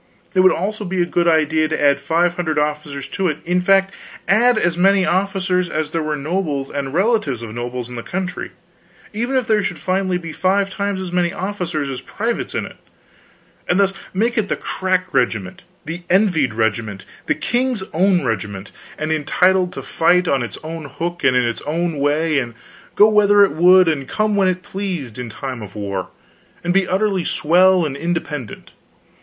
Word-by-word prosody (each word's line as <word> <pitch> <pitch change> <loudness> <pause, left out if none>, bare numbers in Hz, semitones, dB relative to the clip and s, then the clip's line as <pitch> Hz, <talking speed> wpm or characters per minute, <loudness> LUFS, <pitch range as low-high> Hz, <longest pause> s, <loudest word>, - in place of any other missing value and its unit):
It 190 - +2
would 185 0 +6
also 210 +4 -2
be 190 -1 -3
a - - -1
good 175 0 0
idea 155 -1 +3
to 160 - -2
add 140 -1 +3
five 165 +5 +1
hundred 175 -3 -2
officers 150 -2 -2
to 190 -2 -1
it; 155 -3 -1
in 180 +1 +1
fact, 195 +1 +3 0.3
add 235 +4 +4
as 175 -5 +1
many 190 +1 +4
officers 185 0 0
as 155 -1 -2
there 165 - -1
were 155 -1 -2
nobles 150 -2 -2
and 140 -1 -3
relatives 170 - +1
of 110 -2 -7
nobles 120 +1 -4
in 125 - -10
the 120 - -5
country, 180 +6 -4 0.6
even 240 +5 -2
if 255 -2 +2
there 215 -1 +2
should 180 -3 -3
finally 185 -1 0
be 165 -2 -7
five 195 +4 +1
times 200 0 -2
as 185 -2 -5
many 175 -1 +1
officers 180 -7 -3
as 135 -2 -5
privates 230 +4 -3
in - - -1
it; - - -11 0.9
and 180 - +3
thus 195 -1 +3 0.2
make 225 +4 0
it 205 - -2
the - - +1
crack 185 -1 -2
regiment, 110 -6 -1 0.2
the 165 +4 -5
envied 175 - +2
regiment, 110 -3 -1 0.2
the - - +2
King's 245 -3 -1
Own 180 -1 +2
regiment, 100 -3 -3 0.3
and 155 +1 -2
entitled 180 +4 +2
to - - -7
fight 180 +2 +2
on 140 -4 +2
its 120 -4 -5
own 160 0 -6
hook 165 +5 -5
and 125 - +4
in 125 - +3
its 120 -1 -2
own 165 0 -1
way, 150 +1 +1
and 120 -3 -5 0.4
go 210 - +7
whither 205 -1 +5
it - - -3
would 180 +3 +6
and 140 -5 -1
come 215 -1 0
when 195 -2 +3
it 185 0 -1
pleased, 180 - -5
in 125 -2 -5
time 130 +1 -6
of 100 -1 -10
war, 100 -3 -4 0.5
and 175 0 0
be 195 -1 +2
utterly 190 -1 +1
swell 180 +3 +3
and 140 -3 -3
independent. 150 - -4
175 Hz, 190 wpm, -19 LUFS, 145-190 Hz, 0.9 s, go